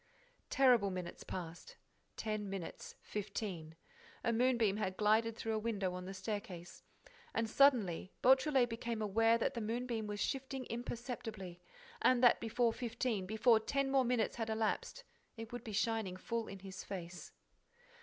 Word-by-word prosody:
Terrible 250 -7 +5
minutes 180 -2 -5
passed: 175 -2 -7 0.4
ten 215 -2 -2
minutes, 190 -4 -6
fifteen. 195 -6 -4 0.5
A 235 - +2
moonbeam 235 -4 +3
had 190 -3 -2
glided 220 +2 +3
through 225 - -2
a 215 - +1
window 205 -5 -1
on 180 0 -5
the 190 - -6
staircase. 190 -3 -5 0.5
And, 225 0 +1
suddenly, 220 -9 +3
Beautrelet 265 0 +5
became 230 -1 -3
aware 225 +3 +4
that 235 - 0
the 235 - -3
moonbeam 230 0 -2
was 205 0 -4
shifting 265 0 -2
imperceptibly, 230 -6 -5 0.4
and 255 -1 +4
that, 245 - +7
before 230 +1 +1
fifteen, 230 -5 -2
before 220 +2 +4
ten 275 +4 0
more 270 -1 +4
minutes 240 -2 0
had 225 -1 -2
elapsed, 220 - -1 0.3
it 225 +1 -7
would 245 - -5
be 220 - -6
shining 215 -3 0
full 230 +4 -3
in 195 -1 -8
his 190 -1 -7
face. 180 -2 -7
220 Hz, 150 wpm, -36 LUFS, 195-240 Hz, 0.5 s, that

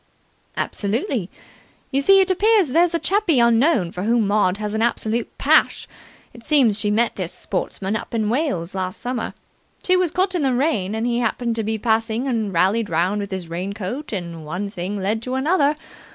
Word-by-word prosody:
"Absolutely. 220 - -2 0.6
You 275 0 +1
see, 390 +7 +6
it 380 0 +1
appears 405 -2 +3
there's 335 +5 +3
a - - +4
chappie 370 -6 +1
unknown 235 - +3
for 180 - -6
whom 225 +2 +2
Maud 200 -2 +2
has 210 0 -4
an 220 - -1
absolute 230 0 -1
pash. - - +2 0.5
It 235 - -14
seems 250 -9 +3
she 210 - 0
met 225 +3 +1
this 180 -3 -2
sportsman 195 +1 -3
up 230 - -5
in 220 -2 0
Wales 215 - -1
last 185 -1 -3
summer. 245 -2 -4 0.5
She 370 - +3
was 365 -1 +2
caught 370 +4 0
in 355 - 0
the 265 -3 +1
rain, 230 - 0
and 220 +1 -2
he 240 0 0
happened 235 0 -1
to 225 - -1
be 220 +1 -1
passing 225 +2 0
and 225 -5 -1
rallied 195 +5 +1
round 180 +5 0
with 200 - -5
his 190 -3 -5
rain 180 +4 -4
coat, 220 +9 -5
and 170 -5 -5
one 180 +6 -4
thing 190 +2 -4
led 210 +4 -1
to 255 +2 -4
another. 290 +1 +2
225 Hz, 195 wpm, -21 LUFS, 200-275 Hz, 0.6 s, see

